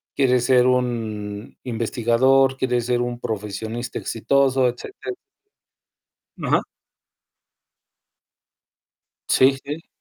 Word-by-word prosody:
¿Quieres 125 -3 +2
ser 125 -1 +5
un 110 -4 -2
investigador? 125 +3 +2
¿Quieres 125 -2 0
ser 120 -1 +1
un 120 0 -3
profesionista 110 +2 -4
exitoso?", 130 +3 +2
etcétera. 365 - -6 1.3
Ajá. - - +2 2.7
Sí, 135 +1 +4
sí. 150 +3 -7
125 Hz, 80 wpm, -22 LUFS, 115-130 Hz, 2.7 s, ser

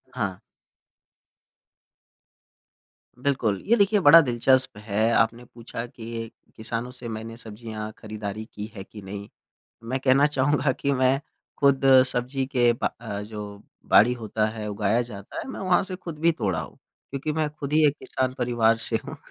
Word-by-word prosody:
हाँ। 100 -6 -2 2.8
बिल्कुल। 125 -8 0
ये 230 - +5
देखिए 205 0 +4
बड़ा 165 -2 +9
दिलचस्प 125 -2 +2
है, 105 +2 0
आपने 115 +1 +2
पूछा 115 0 -7
कि 115 -1 -7 0.2
किसानों 115 +2 -4
से 125 -1 -9
मैंने 110 +1 -6
सब्ज़ियाँ 110 -1 -7
खरीदारी 105 -1 -6
की 105 - -5
है 95 - -6
कि 105 +1 -12
नहीं? 100 +1 -8 0.5
मैं 125 +3 -2
कहना 135 +2 +5
चाहूँगा 145 -1 +1
कि 140 +2 -1
मैं 130 0 +2 0.4
खुद 140 -1 +3 0.2
सब्ज़ी 130 +2 -2
के 120 -3 +3
ब 115 - -1
अ, 100 0 -4
जो 105 -1 -8 0.3
बाड़ी 115 +4 +7
होता 110 -2 -1
है, 110 0 -5
उगाया 105 +2 +1
जाता 105 -4 -9
है - - -5
मैं 265 - -6
वहाँ 185 -1 +3
से 185 -1 -6
खुद 170 -4 -8
भी 165 +2 +3
तोड़ा 100 - -1
हूँ। 75 - -9 0.3
क्योंकि 140 +3 -3
मैं 155 0 0
खुद 145 -1 -7
ही 155 0 +5
एक 145 0 +2
किसान 130 -1 -2
परिवार 120 -2 +3
से - - 0
हूँ। - - -7
120 Hz, 160 wpm, -25 LUFS, 110-140 Hz, 2.8 s, बड़ा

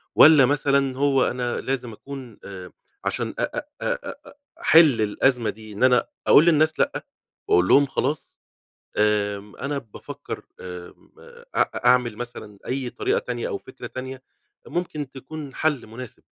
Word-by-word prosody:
والّا 150 -3 +8
مثلًا 140 -1 +1
هو 135 -1 +3
أنا 125 -1 -2
لازم 130 -3 -3
أكون 130 -1 -9
آآ، 95 -2 -9 0.3
عشان 115 +3 -2
أ - - +1
أ 295 - -3 0.2
أ - - -1 0.4
أ - - -13 0.3
أحل 155 -8 +6
الأزمة 115 +3 +2
دي 110 -1 -9
إن 105 - -2
أنا 125 -1 +4 0.2
أقول 155 - +7
للناس 155 -1 +3
لأ، - - 0 0.4
وأقول 90 +1 +4
لهم 140 +7 +6
خلاص؟ 140 +2 -3 0.6
آمم، 105 -1 0
أنا 140 +1 -3
بافكر 115 -6 -8 0.2
آمم، 90 -1 -10 0.4
أ - - 0
أعمل 125 -3 +4
مثلًا 110 -4 -8
أي 130 -1 -2
طريقة 410 - 0
تانية 485 0 -4
أو 425 -5 -3
فكرة - - -10
تانية 130 0 -7 0.5
ممكن 150 -5 -3
تكون 140 +1 -9
حل 150 -5 0
مناسب. 115 +2 -10
130 Hz, 145 wpm, -24 LUFS, 110-145 Hz, 0.6 s, والّا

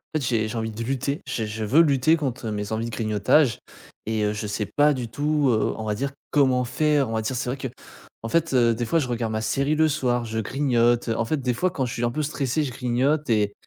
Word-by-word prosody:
fait, 155 - +1
j'ai 115 -4 0
j'ai 115 +1 -5
envie 110 0 -2
de 110 +2 -7
lutter 135 +4 -2
je 120 -3 -2
je 110 +1 -4
veux 150 +10 +5
lutter 145 +1 +4
contre 130 -7 -3
mes 105 0 -4
envies 110 +1 -1
de 110 - -6
grignotage. 110 +3 +2 0.5
Et 110 -1 -1
heu, 105 - +1
je 105 0 -4
sais 105 +1 -2
pas 145 +7 +3
du 125 -4 -4
tout, 145 +3 +1
heu, 110 -3 +1
on 110 - -5
va 105 -1 -1
dire, 140 +6 -2 0.2
comment 130 -3 +3
faire. 145 0 +1
On 115 - -4
va 110 - 0
dire, 110 +4 -3
c'est 125 - -2
vrai 130 - -2
que, 135 - -4 0.6
en 115 - -4
fait, 165 +1 +1
heu, 120 -2 +4
des 120 +1 -2
fois, 165 +8 +2
je 130 -5 -2
regarde 115 -2 -2
ma 110 - -1
série 140 +6 0
le 155 0 +3
soir, 125 -5 0
je 110 -1 -3
grignote. 120 -1 +1
En 115 0 0
fait, 155 +7 0
des 125 -1 0
fois, 185 +9 0
quand 140 -7 -2
je 120 - -4
suis 120 - -1
un 120 - 0
peu 155 - -2
stressé 145 0 -1
je 140 - -3
grignote, 130 +5 0
et 105 -3 +2
125 Hz, 265 wpm, -24 LUFS, 110-140 Hz, 0.6 s, veux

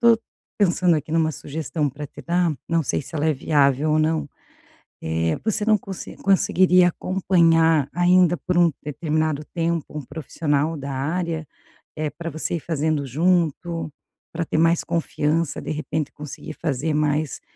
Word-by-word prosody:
tô 235 -1 +6 0.4
pensando 180 -3 +3
aqui 155 +1 -5
numa 160 -1 +2
sugestão 150 0 -3
pra 145 +2 -7
te - - -12
dar, 175 0 +1 0.2
não 165 -1 +1
sei 145 - -1
se 160 - -12
ela 155 +1 0
é 155 - +3
viável 140 +1 +2
ou 155 - +3
não, 155 -1 +1 0.8
eh, 80 0 0
você 215 -1 0
não 215 -1 +4
conse 190 -1 -8
conseguiria 185 -2 +4
acompanhar 165 -5 +3
ainda 175 0 +4
por 180 +1 -1
um 170 -2 +5
determinado 155 0 -1
tempo 165 -3 -2
um - - -5
profissional 155 +1 -1
da 140 -1 -5
área, 160 +3 -2 0.5
eh, 155 -1 -1
pra 170 -1 -6
você 160 +3 -3
ir - - -2
fazendo 155 -2 -1
junto, 165 +2 0 0.4
pra 165 0 -3
ter - - -2
mais 165 +1 +3
confiança, 165 -2 -1
de - - -5
repente 155 -1 -3
conseguir 150 +1 -8
fazer 155 -1 -2
mais 150 0 0
160 Hz, 155 wpm, -23 LUFS, 150-170 Hz, 0.8 s, tô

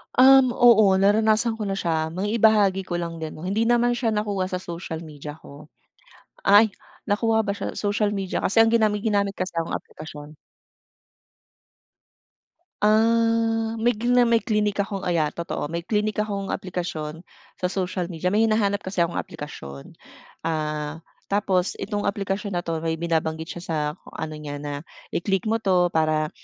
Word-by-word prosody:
Um, 260 -1 +7
oo, 220 -5 +6
naranasan 215 +3 +2
ko 210 - -2
na 195 - -1
siya. 160 -4 0
Maibahagi 205 -1 +2
ko 175 - -2
lang 170 -1 -4
din 160 -1 -6
'no. 155 - -10
Hindi 205 +5 0
naman 240 0 +3
siya 240 -2 0
nakuha 205 -3 -1
sa 185 -1 -4
social 170 -2 -6
media 150 -1 -9
ko. 150 -1 -14 0.8
Ay, 205 +2 +7 0.4
nakuha 220 +2 +2
ba 200 - -3
siya 200 - -4
sa - - -7
social 205 0 0
media? 195 -2 -2
Kasi 225 +3 +5
ang 225 - +3
ginami 215 -3 +2
ginamit 200 -2 +1
kasi 185 -1 -4
akong 165 - -2
aplikasyon. 150 -1 -9 2.5
Ah, 225 +1 +3
may 235 - +4
gina 245 +2 +3
may 235 -1 +4
klinik 210 -3 0
akong 200 -1 -2
ah, - - -2
yeah, 155 -3 +1
totoo. 170 -3 -4
May 170 +3 -4
klinik 210 +3 0
akong 200 -2 -3
aplikasyon 170 -3 -5 0.3
sa 180 - -1
social 185 -1 -2
media, 175 0 -2
may 215 +4 +3
hinahanap 210 -2 +1
kasi 190 -1 -1
akong 170 0 0
aplikasyon. 70 - -8 0.5
Ah, 155 -1 -2 0.3
tapos 195 -2 +1
itong 205 -2 -2
aplikasyon 200 0 -2
na 175 - 0
'to 165 -2 -2
may 165 0 -1
binabanggit 160 -1 -2
siya - - -7
sa 160 - -2 0.4
ano 155 -1 -5
niya, 145 -1 -6
na 145 +1 -5 0.2
i-click 195 +3 -1
mo 225 - +2
'to 185 -5 +2
para 155 -2 +1
195 Hz, 160 wpm, -24 LUFS, 165-215 Hz, 2.5 s, Um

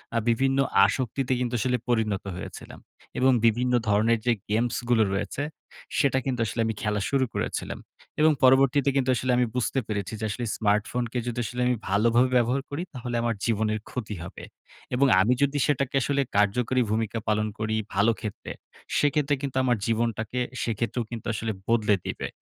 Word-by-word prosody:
আ - - +3
বিভিন্ন 135 +3 +2 0.3
আসক্তিতে 130 +4 -1
কিন্তু 125 -1 -2
আসলে 125 +2 +1
পরিণত 110 -4 +1
হয়েছিলাম - - -9 0.4
এবং 130 +1 +5
বিভিন্ন 125 +2 +2 0.2
ধরনের 110 +2 +3
যে 120 - +4 0.2
গেমসগুলো 120 +1 +1
রয়েছে, 135 +8 -2 0.5
সেটা 135 -1 +3
কিন্তু 130 -2 -2
আসলে 115 - -2
আমি 110 - -1
খেলা 105 -1 -1
শুরু 135 -2 +2
করেছিলাম। - - -3 0.4
এবং 155 +1 +6
পরবর্তীতে 135 +1 +5
কিন্তু 130 -1 +1
আসলে 125 +2 0
আমি 125 - +3
বুঝতে 125 +2 0
পেরেছি 100 -1 -3
যে 110 - -2
আসলে 120 +4 -3
স্মার্টফোনকে 115 +3 0
যদি 120 0 -3
আসলে 125 +2 -4
আমি 125 - +2
ভালোভাবে 115 +5 +3
ব্যবহার 125 +3 +1
করি, 145 +4 -3
তাহলে 120 -1 -5
আমার 115 -1 0
জীবনের 110 -1 0
ক্ষতি 110 -4 -5
হবে - - -9 0.5
এবং 140 +2 +4
আমি 110 +6 +3
যদি 140 +1 +2
সেটাকে 140 -2 0
আসলে 140 +3 +1 0.2
কার্যকরী 120 +5 +2
ভূমিকা 110 0 -1
পালন 105 0 +1
করি 110 0 -1 0.2
ভালো 105 +4 +4
ক্ষেত্রে, 105 -3 -6 0.5
সেক্ষেত্রে 145 0 +2
কিন্তু 135 -2 -3
আমার 125 -2 +2
জীবনটাকে 115 +1 -1 0.2
সেক্ষেত্রেও 115 +1 -2
কিন্তু 115 -2 -6
আসলে 110 +1 -2 0.2
বদলে 110 -3 +3
দিবে - - -3
120 Hz, 165 wpm, -26 LUFS, 110-130 Hz, 0.5 s, এবং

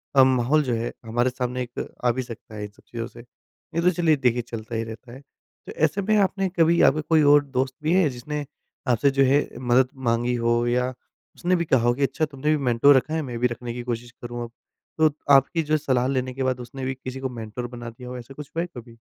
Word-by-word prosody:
अ, 135 - +8
माहौल 130 +4 +3
जो 125 -4 -1
है 115 +1 -2
हमारे 120 +3 +1
सामने 125 0 -3
एक 120 0 -6 0.2
आ 120 - +5
भी 130 - -2
सकता 115 -2 -10
है 105 - -5
इन 105 - -6
सब - - -24
चीज़ों 115 -1 -5
से। 120 - -14 0.6
ये 170 - +2
तो 180 - +4
चलिए 170 -3 +3
देखिए 125 -3 +1
चलता 115 -1 -7
ही 115 - -1
रहता 115 +2 -9
है। 130 - -10 0.5
तो - - -6
ऐसे 160 +6 +1
में 215 +2 +2
आपने 195 -1 +1
कभी 165 +1 +5
आपके 155 +3 +4
कोई 160 -1 +5
और 145 0 +6
दोस्त 130 -1 -2
भी 160 +3 +2
है 185 -4 +4
जिसने 145 +4 -5 0.4
आपसे 125 +3 +3
जो 135 0 +3
है 140 +3 +3
मदद 125 +1 +3 0.2
माँगी 120 +1 +1
हो 120 0 +1
या 125 +1 +1 0.5
उसने 180 +1 +1
भी 170 - 0
कहा 130 -6 +3
हो 120 +1 +3
कि 140 - -2
अच्छा 140 +4 +1
तुमने 150 0 -3
भी - - 0
मेंटोर 125 +3 +5
रखा 155 +4 -1
है 160 - 0
मैं 125 -5 -5
भी 125 - +3
रखने 120 0 -6
की 120 - -5
कोशिश 120 0 -4
करूँगा? 120 0 -5 0.5
तो 155 -2 +4 0.2
आपकी 140 +5 +4
जो 155 - +4
सलाह 130 -4 +1
लेने 130 -1 -1
के 130 +1 -3
बाद 130 -1 0
उसने 130 +2 -7
भी 130 - -1
किसी 130 0 -7
को 130 -1 -3
मेंटोर 120 0 -6
बना 120 -1 -8
दिया 125 +2 -10
हो 125 - -6
ऐसा 125 +3 -10
कुछ 145 0 -10
हुआ 165 - +1
है 175 - -5
कभी? 115 -1 -11
130 Hz, 250 wpm, -24 LUFS, 120-145 Hz, 0.6 s, अ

